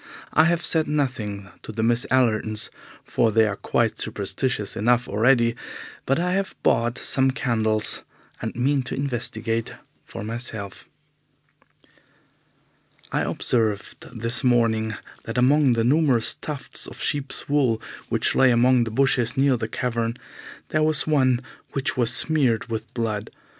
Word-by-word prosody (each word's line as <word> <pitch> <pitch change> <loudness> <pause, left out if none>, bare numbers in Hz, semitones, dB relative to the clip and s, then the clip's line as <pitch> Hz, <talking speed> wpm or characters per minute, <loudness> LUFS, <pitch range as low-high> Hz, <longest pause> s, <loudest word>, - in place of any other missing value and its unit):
I 155 - +5
have 170 0 +1
said 160 -2 +1
nothing 120 -9 -2
to - - -8
the 110 0 -3
Miss 120 +1 +1
Allertons, 110 -4 0 0.3
for 115 -2 +1
they 110 +1 +4
are 105 -2 -2
quite 115 +2 -1
superstitious 105 +1 -3
enough 120 +2 +1
already, 115 +2 +2 0.5
but 135 - +2
I 180 +2 0
have 195 0 -2
bought 120 +1 +1
some 130 0 +1
candles, 110 -4 +1 0.4
and 110 - -5
mean 135 +3 +1
to - - -4
investigate 120 -4 -2 0.3
for - - -8
myself. 110 -3 -4 2.2
I - - 0
observed 110 -4 -2
this 115 +3 -1
morning 115 -3 +1 0.3
that 115 - -5
among 135 +1 +4
the 115 -1 0
numerous 130 -3 +2
tufts 145 -4 -4
of - - -11
sheep's 145 -1 -3
wool 135 -6 +1 0.3
which - - +1
lay 130 - +4
among 120 0 +3
the - - -4
bushes 125 0 +1
near 135 -1 +3
the 115 -2 -3
cavern 115 0 -2 0.5
there 155 - 0
was 155 -1 +3
one 130 -5 +2 0.3
which 135 - -1
was 120 -2 +5
smeared 125 -7 +5
with 110 0 -5
blood. 110 -2 -3
120 Hz, 140 wpm, -23 LUFS, 110-135 Hz, 2.2 s, I